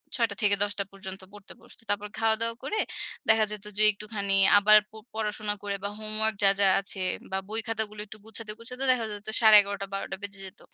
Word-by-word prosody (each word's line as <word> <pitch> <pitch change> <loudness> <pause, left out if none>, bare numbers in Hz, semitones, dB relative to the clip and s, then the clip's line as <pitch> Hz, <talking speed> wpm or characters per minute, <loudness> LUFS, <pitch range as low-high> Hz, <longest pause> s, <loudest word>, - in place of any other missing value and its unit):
৬ঃ০০ 235 -2 +2
টা - - -6
থেকে 205 -1 +4
১০ঃ০০ 205 0 -1
টা - - +1
পর্যন্ত 190 -1 -8
পড়তে 205 -1 -13
বসত। - - -15
তারপর 205 0 -1
খাওয়া 225 0 +3
দাওয়া 230 0 +1
করে 435 - -2 0.5
দেখা 220 0 +5
যেত 210 -1 -8
যে, 215 - +4
একটুখানি 200 -1 -2 0.2
আবার 215 +1 +7
প - - -49 0.2
পড়াশোনা 210 -1 -2
করে 200 -1 -2
বা 200 - -1
হোমওয়র্ক 215 0 0
যা, 195 - +7
যা 200 - +5
আছে 195 -1 -3 0.3
বা 190 - -1
বই 220 +1 0
খাতাগুলো 220 -1 -3
একটু 215 +1 -10
গুছাতে, 220 0 -5
গুছাতে, 250 +3 -6
দেখা 245 -3 +1
যেত 205 0 -9
১১:৩০ 205 -2 +6
টা- 195 - -3
১২ঃ০০ 195 - -2
টা 195 - -3
বেজে 200 -1 -5
যেত। 190 - -11
210 Hz, 220 wpm, -27 LUFS, 200-220 Hz, 0.5 s, আবার